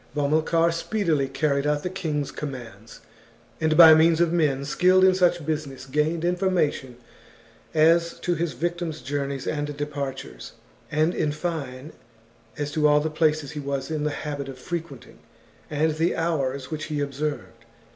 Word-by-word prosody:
Bomilcar 160 Hz, +3 st, +2 dB
speedily 165 Hz, -5 st, 0 dB
carried 140 Hz, +1 st, 0 dB
out 150 Hz, 0 st, 0 dB
the 180 Hz, -, -2 dB
king's 155 Hz, -7 st, -3 dB
commands, 115 Hz, -7 st, -8 dB, 0.6 s
and, 155 Hz, -1 st, +1 dB
by 165 Hz, -2 st, +10 dB
means 160 Hz, +1 st, +4 dB
of 170 Hz, -1 st, +2 dB
men 140 Hz, -5 st, +1 dB
skilled 185 Hz, +5 st, +3 dB
in 190 Hz, 0 st, +6 dB
such 175 Hz, -3 st, +2 dB
business, 145 Hz, -4 st, -4 dB
gained 150 Hz, +5 st, 0 dB
information 175 Hz, -8 st, 0 dB, 0.8 s
as 165 Hz, +2 st, +3 dB
to 175 Hz, -, 0 dB
his 170 Hz, -1 st, -2 dB
victim's 170 Hz, -2 st, -3 dB
journeys 140 Hz, 0 st, -3 dB
and 145 Hz, -1 st, -3 dB
departures, 140 Hz, -, -5 dB, 0.4 s
and, 155 Hz, +3 st, +2 dB
in 150 Hz, -, 0 dB
fine, 150 Hz, -3 st, -5 dB, 0.6 s
as 145 Hz, 0 st, -3 dB
to 150 Hz, 0 st, +2 dB
all 150 Hz, 0 st, +5 dB
the 155 Hz, +1 st, -2 dB
places 155 Hz, -2 st, +1 dB
he 150 Hz, -, -6 dB
was 140 Hz, 0 st, -4 dB
in 155 Hz, -1 st, -2 dB
the 150 Hz, -, +1 dB
habit 145 Hz, -2 st, -5 dB
of 135 Hz, -, -8 dB
frequenting, 160 Hz, -2 st, -7 dB, 0.5 s
and 155 Hz, +1 st, +1 dB
the 165 Hz, +2 st, +1 dB
hours 140 Hz, -5 st, -2 dB
which 155 Hz, 0 st, -4 dB
he 150 Hz, -2 st, -3 dB
observed. 140 Hz, -4 st, -4 dB
150 Hz, 155 wpm, -24 LUFS, 140-165 Hz, 0.8 s, by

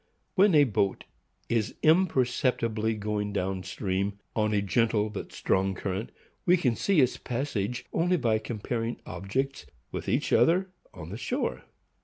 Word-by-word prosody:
When 195 Hz, -2 st, +5 dB
a 145 Hz, -, +8 dB
boat 100 Hz, -6 st, 0 dB, 0.4 s
is 115 Hz, -3 st, 0 dB
imperceptibly 125 Hz, -, +2 dB
going 105 Hz, -1 st, -2 dB
down 95 Hz, -1 st, -1 dB
stream 95 Hz, +2 st, -2 dB, 0.2 s
on 110 Hz, -1 st, +1 dB
a 105 Hz, -, +2 dB
gentle 105 Hz, +1 st, +1 dB
but 105 Hz, -, -6 dB
strong 95 Hz, 0 st, 0 dB
current, 95 Hz, +3 st, -3 dB, 0.3 s
we 180 Hz, +1 st, +5 dB
can 125 Hz, -9 st, +1 dB
see 190 Hz, -, +3 dB
its 130 Hz, -, +2 dB
passage 120 Hz, -3 st, -3 dB
only 180 Hz, +2 st, +2 dB
by 115 Hz, -7 st, +2 dB
comparing 115 Hz, +1 st, -3 dB
objects 130 Hz, +10 st, -3 dB, 0.2 s
with -, -, -4 dB
each -, -, +1 dB
other 185 Hz, +3 st, +4 dB, 0.2 s
on -, -, -9 dB
the -, -, -5 dB
shore. -, -, -2 dB
115 Hz, 145 wpm, -28 LUFS, 100-135 Hz, 0.4 s, a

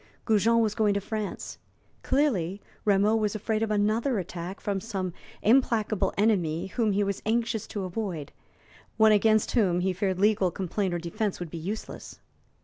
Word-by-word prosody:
Goujon 225 Hz, +1 st, +3 dB
was 215 Hz, -2 st, +1 dB
going 210 Hz, -2 st, +2 dB
to -, -, +2 dB
France. 210 Hz, +1 st, -5 dB, 0.4 s
Clearly, 205 Hz, -, +1 dB, 0.3 s
Rameau 205 Hz, +1 st, +4 dB
was 215 Hz, -1 st, 0 dB
afraid 215 Hz, +1 st, -1 dB
of 225 Hz, -, 0 dB
another 215 Hz, +4 st, +1 dB
attack 180 Hz, +1 st, -5 dB
from 200 Hz, -2 st, -2 dB
some 190 Hz, -5 st, -4 dB, 0.3 s
implacable 215 Hz, -4 st, +2 dB
enemy 185 Hz, -6 st, +1 dB
whom 215 Hz, +2 st, 0 dB
he 205 Hz, +1 st, +2 dB
was 200 Hz, -1 st, -2 dB
anxious 225 Hz, -1 st, -1 dB
to 205 Hz, -, -4 dB
avoid 185 Hz, -6 st, -4 dB, 0.7 s
one 220 Hz, -1 st, +6 dB
against 215 Hz, +1 st, +3 dB
whom 185 Hz, -7 st, +2 dB
he 190 Hz, +1 st, +1 dB
feared 190 Hz, 0 st, -1 dB
legal 205 Hz, -2 st, +3 dB
complaint 185 Hz, +1 st, -2 dB
or -, -, 0 dB
defense 175 Hz, +4 st, -3 dB
would 175 Hz, -3 st, -6 dB
be 170 Hz, -, -5 dB
useless. 200 Hz, +7 st, -6 dB
205 Hz, 160 wpm, -27 LUFS, 185-220 Hz, 0.7 s, one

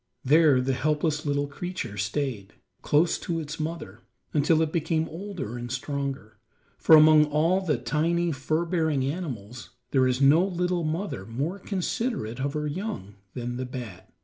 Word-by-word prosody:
There 145 Hz, -2 st, +5 dB
the 130 Hz, +1 st, 0 dB
helpless 150 Hz, +3 st, 0 dB
little 145 Hz, 0 st, +1 dB
creature 145 Hz, -, -5 dB
stayed, 105 Hz, 0 st, -3 dB, 0.3 s
close 160 Hz, +3 st, +2 dB
to 165 Hz, -1 st, -2 dB
its 155 Hz, 0 st, -6 dB
mother, 155 Hz, -, -5 dB, 0.3 s
until 155 Hz, +2 st, +3 dB
it 155 Hz, -, -2 dB
became 160 Hz, 0 st, 0 dB
older 165 Hz, -, -6 dB
and 120 Hz, 0 st, -6 dB
stronger, 135 Hz, -5 st, -4 dB, 0.4 s
for 160 Hz, -, +7 dB
among 155 Hz, 0 st, +7 dB
all 160 Hz, +5 st, +2 dB
the 155 Hz, -8 st, 0 dB
tiny, 165 Hz, +8 st, 0 dB
fur 155 Hz, +4 st, -1 dB
bearing 160 Hz, -6 st, 0 dB
animals 130 Hz, -, -5 dB, 0.2 s
there 130 Hz, -2 st, +4 dB
is 125 Hz, 0 st, 0 dB
no 145 Hz, +5 st, +6 dB
little 180 Hz, -2 st, -1 dB
mother 160 Hz, -, -3 dB
more 145 Hz, +12 st, -3 dB
considerate 195 Hz, -, -3 dB
of 140 Hz, +1 st, -1 dB
her 150 Hz, -1 st, -2 dB
young 155 Hz, -, -4 dB, 0.2 s
than 120 Hz, 0 st, -4 dB
the 130 Hz, -, -3 dB
bat. 120 Hz, -8 st, -8 dB
150 Hz, 155 wpm, -26 LUFS, 130-165 Hz, 0.4 s, for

